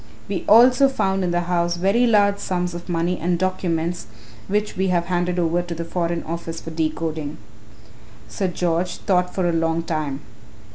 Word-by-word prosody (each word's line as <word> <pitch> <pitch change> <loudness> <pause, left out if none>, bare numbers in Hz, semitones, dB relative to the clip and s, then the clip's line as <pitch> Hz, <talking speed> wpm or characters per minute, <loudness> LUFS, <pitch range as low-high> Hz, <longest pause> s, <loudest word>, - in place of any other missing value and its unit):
We 195 -2 -3
also 250 +5 +7
found 195 -7 0
in 180 - 0
the 175 0 +1
house 175 0 0
very 200 +7 +3
large 205 -3 +3
sums 180 -1 -2
of 175 +1 -8
money 175 +1 0
and 175 +1 0
documents 175 - -1 0.4
which 210 +1 -1
we 190 +1 0
have 175 -2 +1
handed 175 0 -1
over 170 0 +1
to 175 -1 -6
the 165 +1 -4
Foreign 170 0 -2
Office 165 0 -5
for 165 - -8
decoding." 155 -1 -3 0.9
Sir 195 - -2
George 175 0 -1
thought 180 -2 0
for 185 -2 +1
a 170 - +1
long 165 0 0
time. 150 -4 -3
175 Hz, 175 wpm, -22 LUFS, 165-185 Hz, 0.9 s, also